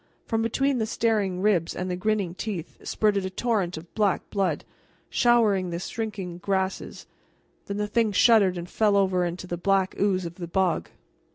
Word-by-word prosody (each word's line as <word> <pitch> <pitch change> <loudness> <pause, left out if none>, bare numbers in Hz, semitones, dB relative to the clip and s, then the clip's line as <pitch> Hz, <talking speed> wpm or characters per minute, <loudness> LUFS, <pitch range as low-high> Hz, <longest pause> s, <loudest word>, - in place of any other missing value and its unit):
From 225 -1 0
between 265 +4 +1
the 220 - 0
staring 205 -5 0
ribs 185 -6 +2
and 180 - -3
the 180 - -2
grinning 200 -2 -1
teeth 185 -3 -5
spurted 205 -2 +1
a 190 - -2
torrent 190 -4 -1
of 165 +2 -11
black 205 -4 +1
blood, 195 -2 0 0.5
showering 215 -6 +3
the 170 - -3
shrinking 190 -2 -5
grasses; 190 0 -2 0.6
then 200 - -3
the 210 - 0
thing 220 +1 +1
shuddered, 200 -4 +5
and 175 0 -5
fell 205 +1 +2
over 185 -2 +2
into 175 +1 -4
the 175 -1 -4
black 195 +1 +1
ooze 190 -3 +1
of 170 0 -7
the 175 -2 -5
bog. 180 -1 0
195 Hz, 175 wpm, -26 LUFS, 180-215 Hz, 0.6 s, shuddered